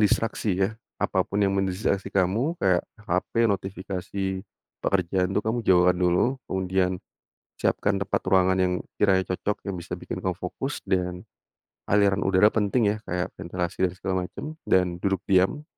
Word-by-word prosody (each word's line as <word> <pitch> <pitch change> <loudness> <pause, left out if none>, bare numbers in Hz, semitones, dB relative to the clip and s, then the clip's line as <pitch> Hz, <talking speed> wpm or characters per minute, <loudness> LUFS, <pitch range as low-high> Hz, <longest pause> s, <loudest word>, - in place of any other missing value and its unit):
distraksi 105 -1 +1
ya, 95 +3 +1 0.2
apa - - 0
pun 100 - -3
yang 95 - +2
mendistraksi 95 0 0
kamu 100 - +1
kayak 95 - +3 0.2
hape, 115 +1 +1
notifikasi, 95 -1 -2 0.4
pekerjaan 95 -1 +1
itu - - +4
kamu 115 +2 0
jauhkan 90 -3 +5
dulu 90 +9 +2
kemudian, 95 -1 0 0.6
siapkan 100 -1 0
tempat 95 - 0
ruangan 95 0 +4
yang 90 -1 +2 0.2
kiranya 95 -3 +3
cocok 100 +3 -2
yang 90 - -4
bisa 85 - -5
bikin - - -6
kamu 95 -1 -1
fokus 100 +10 -5
dan, 90 -2 -1 0.7
aliran 100 -1 +3
udara 95 +3 +5
penting 105 0 +2
ya 110 - -3
kayak 90 0 -2
ventilasi 90 +1 -1
dan - - -6
segala 95 -1 -2
macam - - -8 0.2
dan 90 -1 +2
duduk 95 -1 -1
diam, 95 +9 +2
95 Hz, 150 wpm, -26 LUFS, 90-100 Hz, 0.7 s, jauhkan